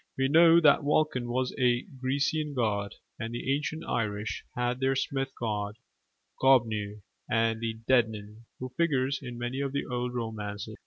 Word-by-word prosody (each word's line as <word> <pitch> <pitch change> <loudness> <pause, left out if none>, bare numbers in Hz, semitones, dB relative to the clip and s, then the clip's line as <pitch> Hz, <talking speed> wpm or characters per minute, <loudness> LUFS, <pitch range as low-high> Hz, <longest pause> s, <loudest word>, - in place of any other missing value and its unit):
We 135 0 +2
know 165 +2 +7
that 150 -4 +5
Vulcan 145 -4 +1
was 130 +1 -1
a 120 -1 +3
Grecian 140 +3 -2
god; 105 -4 -1 0.2
and 115 0 -4
the 135 +3 -1
ancient 150 +2 -3
Irish 105 -2 -2
had 125 +1 -1
their 135 0 +1
smith 135 0 -1
god, 105 -2 -2 0.6
Goibniu, 110 -6 +2 0.3
the 115 0 0
Dedannan, 110 -3 0
who 130 - -6
figures 140 -5 +1
in 125 -3 -7
many 120 +3 -3
of 140 -1 -2
the 140 - -1
old 125 0 -3
romances. 110 -2 -5
125 Hz, 150 wpm, -29 LUFS, 110-135 Hz, 0.6 s, know